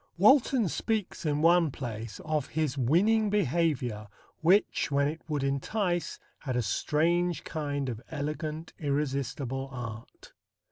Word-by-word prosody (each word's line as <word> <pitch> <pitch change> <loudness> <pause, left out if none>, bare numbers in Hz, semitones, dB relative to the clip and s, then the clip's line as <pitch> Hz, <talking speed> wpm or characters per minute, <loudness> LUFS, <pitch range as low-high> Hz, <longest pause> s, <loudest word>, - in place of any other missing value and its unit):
Walton 235 +2 +5
speaks 210 -1 -2
in 150 +1 0
one 170 -1 +5
place 115 -4 -6
of 155 -3 -1
"his 155 -3 -1
winning 200 - +3
behaviour 145 - 0 0.3
which, 185 +6 +3
when 140 0 +2
it 160 +2 -4
would 150 -3 -1
entice, 175 +6 -1 0.2
had 130 -3 -3
a 125 - +1
strange 170 +9 +1
kind 145 -3 -3
of 115 -3 -4
elegant 155 +1 -4
irresistible 135 -2 -2
art." 115 -3 -8
150 Hz, 125 wpm, -29 LUFS, 135-175 Hz, 0.3 s, Walton